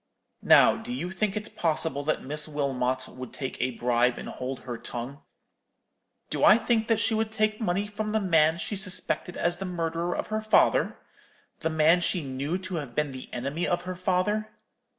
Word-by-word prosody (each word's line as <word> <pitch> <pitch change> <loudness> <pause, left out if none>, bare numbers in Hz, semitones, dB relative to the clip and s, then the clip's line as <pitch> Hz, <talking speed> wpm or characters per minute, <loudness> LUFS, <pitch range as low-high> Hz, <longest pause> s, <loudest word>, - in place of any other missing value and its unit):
Now, - - +6
do 225 +2 -7
you 185 -8 -3
think 200 +1 -1
it 210 0 -6
possible 160 -6 0
that 155 - 0
Miss 150 +3 +1
Wilmot 130 -3 -1
would 130 -1 -9
take 130 - -5
a 130 - +1
bribe, 120 0 +2
and - - -7
hold 130 0 -5
her 125 -2 -5
tongue?' 125 +5 -7 1.1
"'Do - - -1
I 210 - +8
think 225 -1 +1
that 225 -2 +2
she 225 - +1
would 220 0 0
take 215 0 0
money 200 -1 0
from 210 +1 -4
the 220 - +2
man 165 -4 +3
she 205 - -3
suspected 185 -2 0
as 175 0 +1
the 195 - -3
murderer 170 -1 -2
of - - -2
her 215 - 0
father—the 215 -5 0
man 160 +2 +4
she 175 -1 0
knew 140 +5 -2
to 185 -2 -5
have 140 -6 -6
been 150 -2 0
the 130 -1 -9
enemy 140 +7 -2
of 175 0 0
her 185 0 -5
father? 190 +4 0
170 Hz, 190 wpm, -27 LUFS, 140-210 Hz, 1.1 s, I